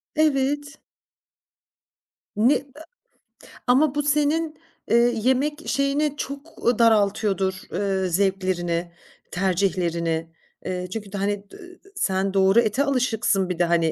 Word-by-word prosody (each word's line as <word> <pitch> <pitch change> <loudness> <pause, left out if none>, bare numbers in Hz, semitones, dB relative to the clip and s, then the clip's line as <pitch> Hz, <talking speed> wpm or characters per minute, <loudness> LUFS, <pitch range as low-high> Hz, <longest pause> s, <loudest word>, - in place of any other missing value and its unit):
Evet. 290 -1 0 1.6
Ne 235 +7 +4
eee - - -2 1.0
Ama 270 +3 +3
bu 295 - 0
senin, 300 +2 +1 0.3
eee, 230 - +5 0.2
yemek 270 +7 0
şeyini 280 +1 +1
çok, 280 +4 -7
u 240 -1 +2
daraltıyordur, 200 -3 +2 0.2
eee, 195 -2 -1
zevklerini, 175 -2 -1 0.4
tercihlerini, 170 -3 -1 0.3
eee, 180 -1 -3
çünkü 210 -3 -5
hani 200 0 -2
d - - -12 0.4
sen 195 - -1
doğru 195 +4 +5
ete 235 +6 +1
alışıksın 225 -8 +1
bir 180 - -3
de 175 - +3
hani 170 -1 +2
205 Hz, 110 wpm, -23 LUFS, 190-280 Hz, 1.6 s, eee